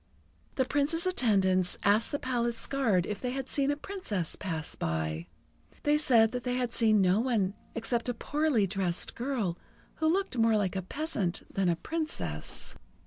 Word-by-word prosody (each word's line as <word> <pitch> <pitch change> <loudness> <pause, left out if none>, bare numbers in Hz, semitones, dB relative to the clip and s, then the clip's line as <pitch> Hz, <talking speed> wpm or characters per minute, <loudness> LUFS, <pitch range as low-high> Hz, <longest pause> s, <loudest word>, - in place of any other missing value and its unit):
The 260 - +2
Prince's 295 +6 0
attendants 190 - +2
asked 210 +3 +3
the 285 - 0
palace 240 -3 -1
guards 225 -11 +2
if 205 -1 -4
they 250 - -1
had 270 -1 -3
seen 280 0 +1
a 290 - +2
Princess 255 - -3
pass 160 -5 -4
by. 80 0 -2 0.6
They 295 +1 +3
said 230 -7 +5
that 250 -1 -4
they 250 -1 -1
had 250 -2 -1
seen 215 -3 +4
no 185 +3 +4
one 225 -6 +1 0.2
except 230 +1 -1
a 245 - -1
poorly 290 -4 +1
dressed 185 -2 -1
girl, 235 -9 -2 0.4
who 315 0 +2
looked 380 -9 0
more 225 -1 +4
like 195 -2 0
a 190 - 0
peasant 200 - -3
than 195 -2 +2
a 170 - +2
Princess. 315 - -4
230 Hz, 170 wpm, -30 LUFS, 190-275 Hz, 0.6 s, said